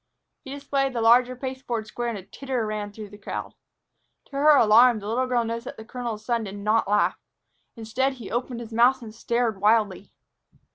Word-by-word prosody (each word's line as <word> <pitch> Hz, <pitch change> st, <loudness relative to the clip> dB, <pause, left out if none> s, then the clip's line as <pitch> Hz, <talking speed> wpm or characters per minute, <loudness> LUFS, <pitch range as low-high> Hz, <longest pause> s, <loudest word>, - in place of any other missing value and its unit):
He -, -, -10 dB
displayed 275 Hz, -1 st, -2 dB
the 235 Hz, -, -2 dB
larger 245 Hz, +2 st, +5 dB
pasteboard 255 Hz, -3 st, -4 dB
square 240 Hz, +2 st, -4 dB
and 230 Hz, -, -4 dB
a 190 Hz, -, -9 dB
titter 255 Hz, +2 st, -4 dB
ran 210 Hz, -1 st, -4 dB
through 210 Hz, 0 st, -9 dB
the 205 Hz, +1 st, -14 dB
crowd. -, -, -6 dB, 0.7 s
To -, -, -29 dB
her 290 Hz, +2 st, +5 dB
alarm, 235 Hz, 0 st, +6 dB
the 205 Hz, -1 st, -7 dB
little 250 Hz, +4 st, 0 dB
girl 245 Hz, -2 st, +1 dB
noticed 230 Hz, +1 st, -4 dB
that -, -, -8 dB
the 220 Hz, -, -10 dB
colonel's 235 Hz, -3 st, -6 dB
son 235 Hz, -1 st, 0 dB
did 200 Hz, 0 st, -7 dB
not 210 Hz, +2 st, +1 dB
laugh. 205 Hz, +1 st, +1 dB, 0.6 s
Instead, 235 Hz, +4 st, -1 dB
he 240 Hz, -6 st, -10 dB
opened 240 Hz, 0 st, -3 dB
his 230 Hz, -1 st, -9 dB
mouth 245 Hz, +3 st, +4 dB
and 215 Hz, -2 st, -9 dB
stared 230 Hz, -3 st, -1 dB
wildly. 210 Hz, -3 st, +2 dB
235 Hz, 195 wpm, -25 LUFS, 215-255 Hz, 0.7 s, alarm